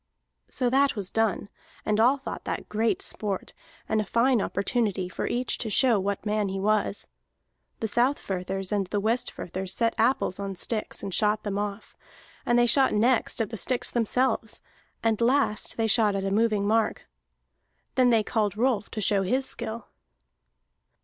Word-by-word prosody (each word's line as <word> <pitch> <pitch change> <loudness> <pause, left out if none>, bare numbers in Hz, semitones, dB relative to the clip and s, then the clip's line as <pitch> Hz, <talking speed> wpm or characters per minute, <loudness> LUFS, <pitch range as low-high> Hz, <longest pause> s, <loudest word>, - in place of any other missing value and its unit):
So 250 - 0
that 275 +1 +3
was 200 -4 -4
done, 225 -3 0 0.4
and 215 0 +1
all 250 +5 +5
thought 270 - -7
that - - -4
great 220 +2 0
sport, 200 -3 -2 0.3
and 220 0 +1
a - - -1
fine 235 +3 +2
opportunity 200 -2 -1
for 180 - -4
each 245 +1 -1
to 225 - -3
show 235 0 +3
what 200 +2 -3
man 210 -1 0
he 195 0 -3
was. 210 0 0 0.8
The 220 - 0
Southfirthers 195 -6 -1
and 200 -2 0
the 205 - -1
Westfirthers 200 -4 -2
set 230 +3 +1
apples 230 -6 +1
on 195 -1 -4
sticks 215 +4 -3
and 195 - -4
shot 210 +3 +1
them 205 -1 -2
off, 205 0 -5 0.5
and 240 - +4
they 240 - +5
shot 260 +1 +3
next 235 +3 +2
at 220 - -2
the 225 - -4
sticks 255 +4 0
themselves, 235 -1 0 0.4
and 225 -1 +1
last 240 -3 +1
they 225 - +1
shot 215 -2 +3
at 195 0 -2
a 195 - -1
moving 210 -1 +2
mark. 220 +1 +1 0.9
Then 255 -1 +4
they 225 -2 +4
called 210 -2 -1
Rolf 235 -3 +1
to 215 - -5
show 200 0 +2
his 255 +8 0
skill. 225 -3 -4
215 Hz, 170 wpm, -26 LUFS, 200-240 Hz, 0.9 s, all